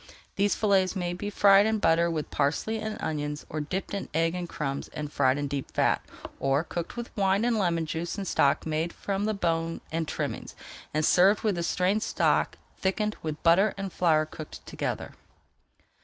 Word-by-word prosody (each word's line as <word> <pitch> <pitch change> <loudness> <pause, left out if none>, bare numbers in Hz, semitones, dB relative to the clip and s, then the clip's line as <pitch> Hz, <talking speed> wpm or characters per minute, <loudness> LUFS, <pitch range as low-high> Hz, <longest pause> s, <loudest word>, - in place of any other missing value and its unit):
These 200 +1 +2
fillets 195 -2 +2
may 175 -2 -2
be 205 +3 -4
fried 200 0 +6
in 220 0 +1
butter 170 -3 +3
with 155 -3 -3
parsley 150 +10 0
and 215 0 -4
onions, 150 -1 -3
or 155 - -3
dipped 185 +8 -4
in 200 - -4
egg 165 +1 +2
and 180 -1 -4
crumbs, 140 -2 -3
and 150 -1 -5
fried 130 -1 +3
in 145 0 -2
deep 140 -1 -4
fat, - - +2 0.4
or 135 +2 +2
cooked 170 +4 -5
with 240 0 -6
wine 195 +2 +2
and 240 -1 +2
lemon 170 -4 +1
juice 165 +4 -3
in 200 - -3
stock 140 -5 +2
made 160 +1 -1
[Page - - -17
399] 200 - -2
from 200 +2 -1
the 215 -2 -1
bone 165 -1 0
and 160 -1 -1
trimmings, - - -4 0.4
and 155 +1 +1
served 190 +5 +5
with 215 -2 +2
the 170 - -2
strained 185 +5 +1
stock - - +1 0.2
thickened 210 +3 0
with 155 -1 -5
butter 185 +5 +4
and 195 -2 -5
flour 155 -3 +3
cooked 155 0 -10
together. - - -4
170 Hz, 195 wpm, -28 LUFS, 155-200 Hz, 0.4 s, fried